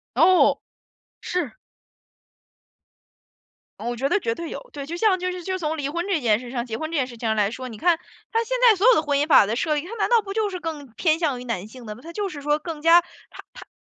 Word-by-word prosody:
哦， 350 +7 +5 0.6
是。 360 +5 -3 2.2
嗯， - - -4
我 240 - -3
觉 270 +4 0
得 415 - +2
绝 230 -8 -1
对 335 +5 -6
有。 - - -8
对， 280 -1 -6
就 335 +4 -5
像 380 0 +3
就 365 0 -2
是 360 0 -7
就 375 +2 -3
从 320 -2 -2
离 285 -3 -2
婚 340 +4 -3
这 380 -6 0
件 220 -5 +3
事 245 0 -9
上 240 -2 -2
结 225 -3 -5
婚 315 0 -4
这 - - -1
件 265 -3 +1
事 240 - -11
情 230 - -5
上 220 - +2
来 205 -1 +2
说， 255 +2 -6
你 225 - -9
看， 340 +7 +2 0.3
它 455 +1 +1
现 - - -1
在 430 - +4
所 395 +5 +2
有 - - +8
的 310 - +2
婚 290 -2 0
姻 290 - +1
法 280 -9 +6
的 220 +3 -2
设 305 +4 0
立， 295 - -1
它 395 +6 -7
难 425 - 0
道 470 -2 +4
不 390 -1 -6
就 430 0 0
是 365 -2 -6
更 315 -4 -5
偏 315 +5 +1
向 290 -7 -1
于 - - -8
男 225 -6 -3
性 245 +3 -13
的 210 -1 -6
嘛， - - -14
它 335 - -9
就 410 +2 -2
是 300 -6 -8
说 295 +1 +1
更 320 -1 -6
加 335 +2 +7
它 350 - -16
它 - - -12
315 Hz, 290 characters per minute, -23 LUFS, 255-365 Hz, 2.2 s, 有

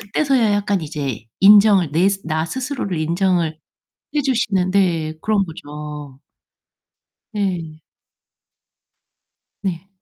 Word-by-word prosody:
그때서야 230 +1 +1
약간 205 -1 0
이제 145 -7 -5 0.2
인정을 200 -4 +6
내 170 +6 +3 0.2
나 160 -1 -1
스스로를 255 - -3
인정을 170 0 0 0.6
해 300 - +2
주시는 220 -9 0
네 170 -5 +1
그런 210 -2 +1
거죠. 150 -4 -9 1.1
네. 175 -7 -3 1.8
네. 185 -2 -3
185 Hz, 185 characters per minute, -20 LUFS, 155-205 Hz, 1.8 s, 인정을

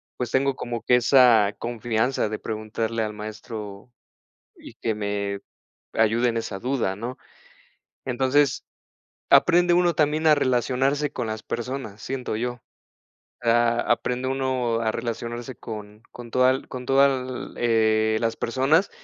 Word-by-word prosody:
pues, 125 -2 -3
tengo 135 +1 +1
como 120 -2 -5
que 125 - +4
esa 120 -5 +5
confianza 120 0 -1
de 110 - -3
preguntarle 110 +1 -3
al 105 -1 -2
maestro 105 0 -8 0.6
y - - -13
que 110 -2 -2
me 100 -1 -3 0.5
ayude 115 +2 +2
en 115 - -2
esa 100 -3 -4
duda, 120 -6 -1
¿no? 120 +4 -6 0.9
Entonces, 130 +2 +1 0.7
aprende 175 +1 +5
uno 175 -1 +3
también 155 +1 +2
a 155 - +7
relacionarse 135 +2 +1
con 120 - -3
las 110 0 -5
personas, 120 -4 -5
siento 130 -1 -4
yo. 120 +2 -3 0.9
Ah, 120 0 +3
aprende 125 +2 0
uno 130 -3 0
a 110 - +1
relacionarse 120 +2 -5
con 105 -1 -9
con 120 -1 -11
toda 130 +2 +3
con 125 -1 -7
toda, 135 -2 +1
eh, 110 -2 +2
las 115 0 -1
personas 135 - +1
120 Hz, 130 wpm, -24 LUFS, 110-130 Hz, 0.9 s, a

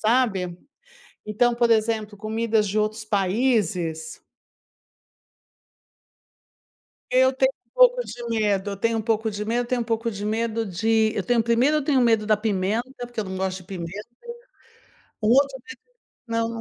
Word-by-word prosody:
sabe? 215 -7 +1 0.7
Então, 235 +3 +2
por 235 0 +2
exemplo, 220 -2 +1
comidas 220 0 0
de 210 +3 0
outros 215 +1 -1
países 190 -6 0 2.9
eu 260 +1 +4
tenho 265 0 +2
um - - -43
pouco - - +5
de 240 0 -8
medo, 205 -3 0
eu 200 - -5
tenho 230 +2 0
um - - -2
pouco 220 0 0
de 210 0 -4
medo, 230 +3 0
eu 245 - -3
tenho 250 -1 0
um - - -6
pouco 230 0 -1
de 205 -1 -6
medo 225 +1 -1
de 220 +4 +1
eu 205 - -1
tenho 240 +2 +2
1º 240 +6 +2
eu 295 - -1
tenho 275 -3 +2
medo 225 -3 +3
da 215 - +4
pimenta, 220 +5 -2
porque 240 -2 -5
eu - - -3
não 190 -1 -6
gosto 190 0 -2
de 185 - -14
pimenta. 190 +3 -7 1.1
O 215 - 0
outro 275 +2 +3
medo 455 - -12 0.5
Não, 230 0 -1
220 Hz, 165 wpm, -24 LUFS, 205-240 Hz, 2.9 s, pouco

